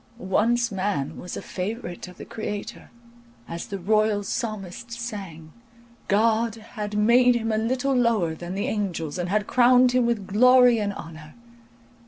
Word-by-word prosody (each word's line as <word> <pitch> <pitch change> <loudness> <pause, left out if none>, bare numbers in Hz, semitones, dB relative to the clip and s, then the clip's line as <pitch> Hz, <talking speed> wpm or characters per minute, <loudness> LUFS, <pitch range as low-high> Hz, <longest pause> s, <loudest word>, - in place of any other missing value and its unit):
Once 235 +4 +1
man 185 -8 -2
was 180 - -7
a - - -7
favourite 185 -2 -5
of 180 - -13
the - - -9
Creator, 210 -2 -6 0.6
as 170 0 -6
the 200 - -5
royal 215 +2 +1
psalmist 215 0 -5
sang, 195 -10 -7 0.5
"God 225 +2 +2
had 210 -2 -6
made 240 +3 +5
him 225 -1 -1
a 215 - +1
little 255 +4 0
lower 230 -10 +2
than 175 +3 -7
the 200 - -2
angels, 180 -6 -3
and 175 0 -2
had 210 +1 +1
crowned 250 +1 +5
him 250 -1 +2
with 225 -4 -1
glory 250 +3 +5
and 205 -1 -1
honour. 160 -5 -10
215 Hz, 155 wpm, -24 LUFS, 185-235 Hz, 0.6 s, made